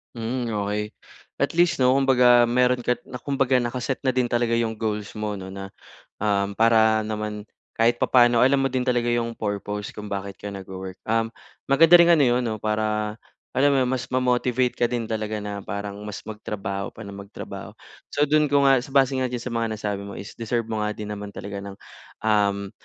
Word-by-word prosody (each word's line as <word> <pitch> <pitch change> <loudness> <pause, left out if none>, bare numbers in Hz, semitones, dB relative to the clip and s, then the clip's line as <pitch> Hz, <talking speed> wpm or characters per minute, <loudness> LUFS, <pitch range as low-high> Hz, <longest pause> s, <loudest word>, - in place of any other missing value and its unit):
Mm, 120 +1 -3
okey. 105 0 -2 0.5
At - - 0
least 175 -2 +3
'no, 130 0 +4
kumbaga 125 -3 +5
meron 125 +1 +2
ka 125 - 0
na - - -9
kumbaga 135 0 0
naka-set 125 +3 -3
na 130 - +2
din 125 -1 +1
talaga 120 -1 0
'yong 115 -1 0
goals 105 -1 -3
mo 105 -1 -3
'no, 95 - -8
na, 95 0 -8 0.5
um, 100 -1 0
para 110 -1 +4
naman 105 -1 -4 0.3
kahit 115 +1 +2
papaano 120 -2 +4
alam 135 +2 +4
mo 135 - 0
din 130 0 -1
talaga 120 -1 +1
'yong 115 -1 -1
purpose 105 -1 -4
kung 105 0 -8
bakit 100 -1 -5
ka 105 - -7
nag-wo-work. 95 -1 -7
Um, 115 0 +1 0.4
maganda 165 +5 +7
ring 170 - +7
ano 150 - +4
'yon 125 -1 +3
'no, 110 - -2
para 110 0 -1 0.3
alam 140 +3 +3
mo - - +3
'yon, 125 - -1
mas 130 -2 -2
ma-motivate 125 0 +1
ka 120 - +3
din 120 -1 -2
talaga 110 -1 -3
na 100 -1 -4
parang 100 +1 -5
mas 105 - -7
magtrabaho 100 -2 -5
pa 110 - -9
nang 100 -1 -9
magtrabaho. 100 0 -9 0.3
So, 145 - 0
do'n 150 +1 +3
ko 140 0 +3
nga 135 -1 +5
base 135 +1 +2
nga 130 - +1
diyan 120 -1 -5
sa 125 - -5
mga 115 -1 0
nasabi 105 -2 -3
mo 100 - -8
is 100 - -8
deserve 115 +1 -1
mo 110 - -1
nga 105 0 -1
din 105 -1 -6
naman 105 -1 -7
talaga 100 0 -6
ng, 100 0 -8 0.5
um, 100 -2 +1
115 Hz, 200 wpm, -24 LUFS, 105-125 Hz, 0.5 s, maganda